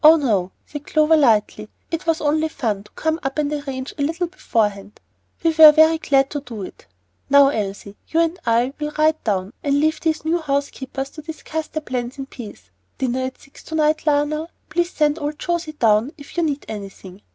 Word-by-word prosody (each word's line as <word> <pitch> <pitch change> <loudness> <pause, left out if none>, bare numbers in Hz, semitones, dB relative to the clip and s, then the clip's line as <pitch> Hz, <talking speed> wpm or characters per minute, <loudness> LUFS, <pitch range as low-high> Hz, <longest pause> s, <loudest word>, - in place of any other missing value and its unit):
"Oh, 310 +2 +9
no," 210 - 0
said 295 -1 -8
Clover, 310 +1 +4
lightly. 215 -6 +2 0.2
"It 330 +1 -3
was 330 0 +1
only 310 +1 +1
fun 210 -9 -3
to - - -19
come 320 +1 -1
up 270 +2 -3
and 300 -1 0
arrange 270 -2 -5
a 290 - -5
little 330 +5 0
beforehand. 210 - -2 0.4
We 330 - +4
were 315 -1 +10
very 315 +1 +5
glad 275 -3 +2
to 290 - -3
do 230 -7 -7
it. - - -11 0.4
Now, 280 0 +7
Elsie, 200 -4 -4
you 325 - 0
and 335 +2 +1
I 235 +3 +2
will 300 0 -3
ride 315 +1 +2
down, 195 -1 -1
and 285 0 +1
leave 310 +1 +1
these 315 -1 -1
new 335 +2 +1
housekeepers 275 -2 -3
to 310 - -10
discuss 315 0 -5
their 315 - -5
plans 250 -1 -4
in 270 - -5
peace. 210 - -11 0.3
Dinner 260 0 -1
at 260 - -7
six 275 - -17
to 320 - -5
night, 310 0 +1
Lionel; 300 +1 +1
and 335 - -28
please 345 0 0
send 300 +1 +1
old 295 +1 -3
José 340 -3 -3
down 225 +4 +3
if 285 -2 -13
you 345 - +1
need 295 -3 -1
anything. 195 -2 -9
290 Hz, 205 wpm, -21 LUFS, 240-315 Hz, 0.4 s, were